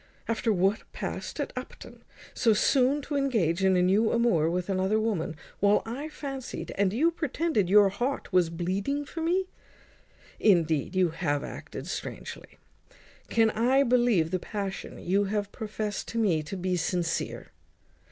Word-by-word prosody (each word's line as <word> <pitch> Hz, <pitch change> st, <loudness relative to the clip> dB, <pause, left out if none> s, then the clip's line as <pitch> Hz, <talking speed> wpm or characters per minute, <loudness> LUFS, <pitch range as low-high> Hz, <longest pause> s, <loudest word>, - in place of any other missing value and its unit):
After 230 Hz, 0 st, 0 dB
what 195 Hz, +2 st, +2 dB
past -, -, -5 dB
at -, -, -3 dB
Upton, -, -, -9 dB, 0.3 s
so 225 Hz, -3 st, +3 dB
soon 270 Hz, +6 st, +3 dB
to 290 Hz, -, -4 dB
engage 210 Hz, -, +1 dB
in 190 Hz, -1 st, +4 dB
a 180 Hz, -, +3 dB
new 205 Hz, +5 st, +3 dB
amour 215 Hz, -10 st, +2 dB
with 180 Hz, +1 st, -2 dB
another 195 Hz, +2 st, +1 dB
woman, 205 Hz, -8 st, -1 dB, 0.2 s
while 205 Hz, +1 st, +3 dB
I 265 Hz, +7 st, -5 dB
fancied, 270 Hz, -4 st, -6 dB
and 195 Hz, -1 st, +1 dB
you 305 Hz, -, +2 dB
pretended, 310 Hz, -, 0 dB
your 205 Hz, 0 st, +7 dB
heart 240 Hz, +2 st, -3 dB
was 180 Hz, -3 st, +4 dB
bleeding 195 Hz, -, -2 dB
for 325 Hz, +3 st, -6 dB
me? 360 Hz, +4 st, +1 dB, 0.9 s
Indeed, 165 Hz, -4 st, +2 dB
you 185 Hz, -2 st, +3 dB
have 150 Hz, -3 st, -1 dB
acted -, -, -7 dB
strangely. -, -, -7 dB, 0.7 s
Can 225 Hz, -1 st, +3 dB
I 255 Hz, +5 st, +3 dB
believe 240 Hz, -, +3 dB
the 185 Hz, -, 0 dB
passion 200 Hz, 0 st, -5 dB
you 195 Hz, +3 st, +1 dB
have 205 Hz, 0 st, -2 dB
profest 215 Hz, -1 st, -4 dB
to 230 Hz, -, -5 dB
me 190 Hz, -9 st, +2 dB
to 155 Hz, +6 st, -6 dB
be 180 Hz, 0 st, -1 dB
sincere? 170 Hz, 0 st, -2 dB
205 Hz, 150 wpm, -28 LUFS, 180-245 Hz, 0.9 s, your